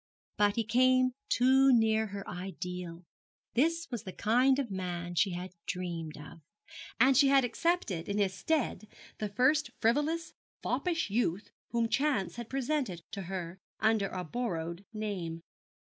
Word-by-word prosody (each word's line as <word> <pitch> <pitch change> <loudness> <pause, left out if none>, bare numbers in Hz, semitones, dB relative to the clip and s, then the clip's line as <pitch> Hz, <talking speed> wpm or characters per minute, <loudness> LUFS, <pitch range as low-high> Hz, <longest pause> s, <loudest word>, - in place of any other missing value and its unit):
But 205 0 +3
he 230 - +1
came 255 +3 +3 0.2
too 265 +2 +5
near 220 -2 +3
her 200 -1 -7
ideal. 180 -1 -6 0.5
This 330 +6 +1
was 240 -4 -3
the 185 - -7
kind 250 +7 +3
of 265 -6 -2
man 175 -2 -4
she 190 +3 +3
had 180 +1 -6
dreamed 170 -4 -4
of, 155 +3 -11 0.6
and 260 +3 +6
she 280 +2 +6
had 270 -1 +5
accepted 240 - -1
in 200 - -1
his 195 -2 +1
stead 245 +1 -1 0.3
the 210 - -2
first 260 +8 +2
frivolous, 295 +8 +1 0.3
foppish 335 - -1
youth 205 -3 0 0.2
whom 235 -1 +1
chance 265 -6 0
had 235 -1 -6
presented 265 - -1
to 200 - -5
her, 185 -1 -5 0.2
under 220 -2 +2
a 185 -1 -4
borrowed 170 -3 -3
name. 190 -7 -4
215 Hz, 145 wpm, -31 LUFS, 180-255 Hz, 0.6 s, and